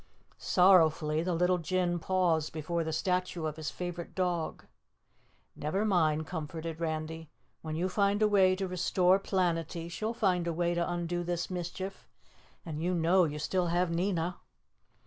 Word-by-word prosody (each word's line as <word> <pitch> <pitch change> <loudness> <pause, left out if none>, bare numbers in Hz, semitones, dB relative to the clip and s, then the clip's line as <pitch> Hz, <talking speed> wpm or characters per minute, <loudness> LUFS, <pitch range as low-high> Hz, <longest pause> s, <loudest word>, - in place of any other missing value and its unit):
Sorrowfully 160 -4 +4
the 175 0 -1
little 180 +1 +2
Jinn 175 +1 0
paused 170 -4 +1
before 165 +2 -2
the 160 - -3
statue 180 0 -1
of 155 -1 -3
his 155 -1 -4
favorite 175 -1 -6
dog. 180 -3 -2 0.9
"Never 190 +8 -1
mind," 160 -6 +2
comforted 160 0 -5
Randy. 160 -1 -4 0.3
"When 155 -1 -5
you 175 +3 0
find 200 +2 +1
a - - +5
way 190 -3 +4
to 190 0 -3
restore 185 +1 +2
Planetty 170 -3 -1
she'll 220 +6 -3
find 180 -6 +1
a 170 - 0
way 175 +1 0
to 170 0 -1
undo 175 0 -2
this 175 +1 -3
mischief, 185 +2 -5 0.6
and 155 -2 -5
you 180 +2 0
know 175 +2 +4
you 150 -1 -4
still 180 +4 0
have 175 +1 +1
Nina." 175 0 -1
175 Hz, 155 wpm, -30 LUFS, 160-185 Hz, 0.9 s, a